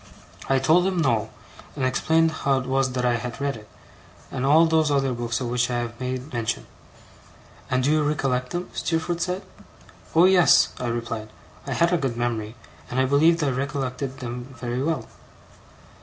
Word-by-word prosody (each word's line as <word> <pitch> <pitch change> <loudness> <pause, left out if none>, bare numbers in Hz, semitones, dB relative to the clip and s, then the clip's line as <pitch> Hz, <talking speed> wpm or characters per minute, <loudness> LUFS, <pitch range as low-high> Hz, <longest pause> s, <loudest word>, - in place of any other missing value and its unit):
I 135 - +4
told 165 +7 +4
him 190 -1 -1
no, 115 -9 +1 0.5
and 135 -3 -1
explained 160 +5 +2
how 140 -3 0
it 130 - -3
was 135 0 0
that 125 -1 -1
I 120 -1 +2
had 120 +1 -6
read 140 -1 -1
it, 105 -1 -13 0.6
and 130 +1 -2
all 160 +4 +6
those 160 -1 +2
other 135 -2 +1
books 120 -1 -2
of 125 - -3
which 120 0 +1
I 120 - -1
have 120 -1 -4
made 130 +2 -4
mention. 115 -1 -2 1.0
'And 130 0 +1
do 145 - +2
you 155 0 +3
recollect 135 -4 0
them?' 175 +1 -4
Steerforth 170 +1 -1
said. 180 +2 -2 0.7
'Oh 165 +2 +7
yes,' 185 -2 +6
I 125 - -2
replied; 115 -2 -4 0.4
I - - -2
had 170 +1 +2
a 175 - +2
good 130 -5 -2
memory, 115 -2 -2 0.3
and 125 - -1
I 130 - +4
believed 155 +5 +3
I 140 - +1
recollected 135 0 -3
them 120 0 -5
very 120 +1 -2
well. 145 -5 -1
130 Hz, 185 wpm, -24 LUFS, 120-155 Hz, 1.0 s, Oh